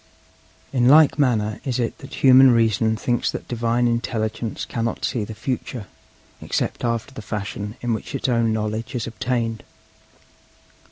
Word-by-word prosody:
'In 125 -2 +3
like 150 +1 +6
manner 110 -6 +1
is 130 -3 -2
it 120 -2 -2
that 135 - -9
human 130 0 +8
reason 115 -2 +2
thinks 120 +2 0
that - - -5
Divine 120 0 +1
Intelligence 115 -1 -2
cannot 115 -1 -2
see 120 -5 -1
the 110 +1 -7
future 125 -2 -4 0.6
except - - -2
after 115 +2 -2
the 110 - -7
fashion 105 +1 -5
in 120 -1 0
which 110 +6 -5
its 135 - -1
own 115 -2 +2
knowledge 110 +4 -3
is 120 - -2
obtained. 115 -1 -2
115 Hz, 150 wpm, -22 LUFS, 110-125 Hz, 0.6 s, human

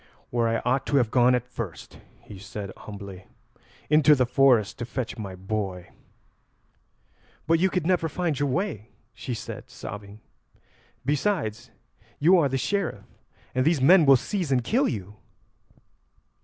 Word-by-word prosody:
"Where 120 -1 +1
I 115 0 -1
ought 130 +2 +1
to - - 0
have 120 -4 +2
gone 125 0 +4
at 125 -1 -2
first," 115 -8 -8 0.2
he 100 - -11
said 100 0 -7
humbly; 100 -3 -10 0.6
"into 150 0 +5
the 130 -2 +2
forest 125 -4 +3
to 120 - -3
fetch 125 -1 -4
my 100 -5 -7
boy." 95 -1 -4 1.6
"But 165 0 +3
you 190 +2 +3
could 180 -3 -2
never 175 -2 +1
find 160 -3 -2
your 145 -1 +1
way," 130 - -2 0.2
she 125 - -5
said, - - -8
sobbing. 100 +1 -9 0.9
"Besides, 130 - -1 0.5
you 175 +5 +5
are 145 -4 +2
the 135 - -1
Sheriff, 200 +6 -2 0.5
and 130 - +1
these 160 +1 +2
men 160 +4 +6
will 135 - +9
seize 180 - -3
and 125 -2 +2
kill 250 - +2
you." 105 -1 -6
125 Hz, 150 wpm, -25 LUFS, 105-155 Hz, 1.6 s, will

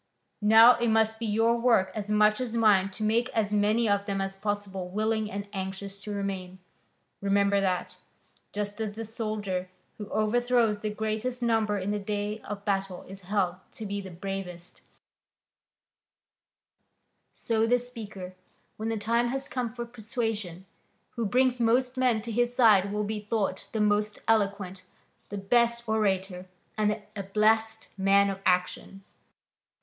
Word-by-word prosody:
Now 225 +3 +8
it 235 0 0
must 220 0 +2
be 230 - -2
your 225 +3 +2
work 230 -6 +3
as 210 0 -5
much 210 +2 +3
as 235 -2 -3
mine 205 -4 +4
to 195 +3 -6
make 230 +4 +2
as 210 -1 +1
many 210 +3 +2
of 200 -1 +1
them 195 -1 -1
as 195 0 -3
possible 195 -2 -3
willing 215 +2 0
and 200 +1 -5
anxious 195 +1 -4
to 210 - -6
remain. 195 -2 -4 0.6
Remember 200 0 +2
that, 185 -2 -1 0.6
just 205 +1 -4
as 210 -2 -3
the 225 0 -5
soldier 210 -4 -3 0.3
who 210 - -6
overthrows 230 0 +2
the 215 - -2
greatest 220 +4 -3
number 220 -3 +1
in 195 +1 -2
the 210 - -1
day 205 +1 -3
of 205 -1 -7
battle 195 -3 -1
is 195 +1 -11
held 185 -2 0 0.2
to 220 - -7
be 200 0 -3
the 190 - -9
bravest, 180 -1 -7 2.5
so 225 -1 0
the 245 +2 +4
speaker, 215 -7 -8 0.4
when 220 +1 -3
the 225 - -1
time 230 +3 +1
has 270 +2 -3
come 245 -3 -3
for 240 0 -5
persuasion, 220 -6 -4 0.5
who 230 -2 -2
brings 255 +3 +2
most 245 +2 +2
men 250 -4 +2
to 235 - -5
his 240 +2 0
side 205 -5 +5
will 210 0 -1
be 210 +1 -3
thought 210 -2 -2
the 220 - -2
most 210 0 +1
eloquent, 200 -4 0 0.5
the 205 - -5
best 235 +4 +2
orator 190 -4 0 0.3
and 215 -1 +2
the 210 0 -3
ablest 220 +2 +1
man 200 +1 +4
of 195 - -6
action. 180 +2 0
210 Hz, 155 wpm, -28 LUFS, 195-225 Hz, 2.5 s, Now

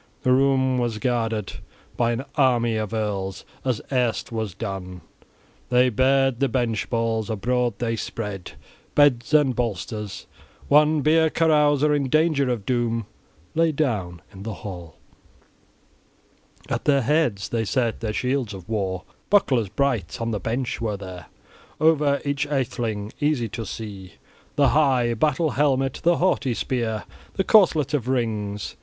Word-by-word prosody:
The 130 - +3
room 130 -1 +3
was 120 -3 -1
guarded 115 -3 -1 0.4
by 120 -1 +1
an 120 +4 -3
army 120 -5 +2
of 110 -1 -2
earls, 100 -4 -3 0.2
as 130 -5 -1
erst 125 -4 0
was 110 -5 -3
done. 95 -4 -6 0.7
They 125 +1 +4
bared 135 +1 +2
the 140 - +2
bench 115 -3 -1
boards; 115 -1 -1
abroad 120 +2 0
they 115 -1 -1
spread 105 -4 -5 0.4
beds 140 -4 +4
and 145 -5 +4
bolsters. 105 -2 -4 0.4
One 150 +1 +4
beer 160 +2 +4
carouser 150 -2 +3
in 140 -3 0
danger 155 -2 +2
of 115 -5 -2
doom 115 -2 0 0.5
lay 165 0 +3
down 105 - -2
in 95 - -11
the 110 0 -5
hall. 90 -5 -7 1.7
At - - -3
their 140 -2 +3
heads 125 - +1
they 115 -1 0
set 115 +2 0
their 110 - -2
shields 125 -2 -1
of 95 -1 -11
war, 95 -4 -2 0.3
bucklers 130 - +3
bright; 110 -7 -1
on 115 0 -2
the 105 - -2
bench 120 +6 -3
were 105 -3 -1
there 90 -4 -9 0.5
over 150 -3 +3
each 140 +1 -1
atheling, 115 -6 -2
easy 145 -6 0
to 110 -1 -5
see, 100 -4 -7 0.4
the 140 -2 +4
high 130 -6 +3
battle 150 +5 +1
helmet, 135 -1 +1
the 170 0 +3
haughty 150 -9 +1
spear, 115 -5 -2 0.3
the 195 - 0
corselet 160 - +4
of 130 -5 0
rings. 110 -5 -2
120 Hz, 145 wpm, -24 LUFS, 110-140 Hz, 1.7 s, They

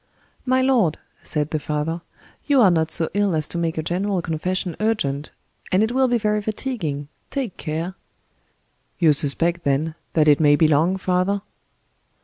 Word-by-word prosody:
"My 260 +1 +3
lord," 235 - +2 0.2
said 150 0 -2
the 155 - 0
father, 155 +3 -2 0.5
"you 285 -2 +4
are 200 -6 +6
not 160 -2 +1
so 160 0 +2
ill 200 -3 +1
as 155 -1 +1
to 170 - -4
make 165 -1 -1
a 160 - -1
general 190 +4 -1
confession 175 +2 -2
urgent—and 185 -1 -2
it 220 - 0
will 260 +1 +3
be 245 -1 +2
very 210 -1 0
fatiguing—take 210 - -4
care." 160 +4 -3 1.0
"You 160 -4 +5
suspect, 165 +4 0
then, 145 +3 0 0.2
that 155 -2 +3
it 145 -1 +6
may 145 -2 +5
be 155 +1 +4
long, 160 +5 +2
father?" 190 +2 0
170 Hz, 155 wpm, -22 LUFS, 155-205 Hz, 1.0 s, are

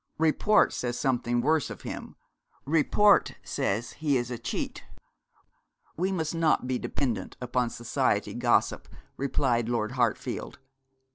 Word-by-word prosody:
'Report 160 +7 +3
says 120 -1 -2
something 120 -3 0
worse 155 +1 +2
of - - -9
him. - - -7 0.5
Report 165 +7 +4
says 110 +5 -2
he 145 -3 0
is 120 0 -3
a 120 - -4
cheat.' - - -4 1.1
'We 185 +4 0
must 160 -3 -2
not 165 -5 +2
be 125 -1 -1
dependent 120 -9 -3
upon 125 -1 0
society 120 0 0
gossip,' - - +1 0.3
replied 125 -4 0
Lord 115 -2 -1
Hartfield. 120 -4 -1
125 Hz, 125 wpm, -28 LUFS, 120-155 Hz, 1.1 s, Report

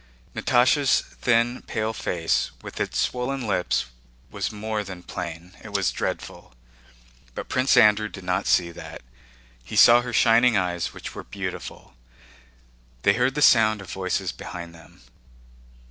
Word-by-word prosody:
Natásha's 130 +3 +3
thin 120 +1 0
pale 110 +1 -2
face, 85 -6 -1
with - - -8
its - - -2
swollen 125 +1 -2
lips, 95 -4 0 0.5
was - - -3
more 105 0 -3
than 95 -3 -9
plain—it 90 +5 -8
was 100 -2 +1
dreadful. - - -5 0.8
But - - -6
Prince 130 +1 +2
Andrew 105 0 +5
did 95 - -10
not 90 +2 -1
see 85 -1 +2
that, 85 - -10 0.6
he - - -8
saw 120 +1 +7
her 125 0 -6
shining 115 0 +4
eyes 90 -2 -1
which - - -9
were - - -8
beautiful. - - -7 1.1
They 100 - +5
heard 125 +5 +1
the 150 - +1
sound 110 -2 +5
of 95 -3 -10
voices 95 0 -2
behind 85 -1 -8
them. 80 -1 -17
105 Hz, 140 wpm, -24 LUFS, 90-120 Hz, 1.1 s, saw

